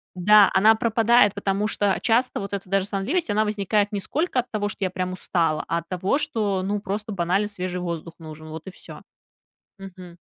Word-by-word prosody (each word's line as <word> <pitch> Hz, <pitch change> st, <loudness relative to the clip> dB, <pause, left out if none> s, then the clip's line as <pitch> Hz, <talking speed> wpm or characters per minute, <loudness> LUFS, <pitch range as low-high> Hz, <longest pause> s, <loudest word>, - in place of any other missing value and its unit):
Да, 205 Hz, +3 st, +6 dB
она 215 Hz, +4 st, +6 dB
пропадает, 225 Hz, -1 st, +3 dB
потому 200 Hz, +1 st, -1 dB
что 205 Hz, -2 st, +1 dB
часто 245 Hz, +2 st, +1 dB
вот 200 Hz, -1 st, -6 dB
эта 195 Hz, -1 st, -4 dB
даже 195 Hz, 0 st, +1 dB
сонливость, 220 Hz, -, -2 dB
она 215 Hz, +1 st, +2 dB
возникает 210 Hz, 0 st, 0 dB
не 205 Hz, -, -2 dB
сколько 280 Hz, -, -1 dB
от 245 Hz, 0 st, -3 dB
того, 210 Hz, -3 st, -2 dB
что 205 Hz, -, -5 dB
я 185 Hz, -, +1 dB
прям 185 Hz, 0 st, -3 dB
устала, 165 Hz, -4 st, -1 dB
а 170 Hz, -, -1 dB
от 170 Hz, -, -13 dB
того, 185 Hz, +7 st, 0 dB
что, 215 Hz, -10 st, -1 dB
ну, 205 Hz, +2 st, -1 dB
просто 205 Hz, +2 st, -5 dB
банально 190 Hz, +2 st, 0 dB
свежий 185 Hz, -3 st, -4 dB
воздух 170 Hz, -1 st, -5 dB
нужен, 155 Hz, -1 st, -11 dB
вот 160 Hz, 0 st, -8 dB
и 190 Hz, -, -8 dB
всё. -, -, -11 dB, 0.8 s
Мгм. 185 Hz, -2 st, -11 dB
200 Hz, 200 wpm, -23 LUFS, 185-215 Hz, 0.8 s, Да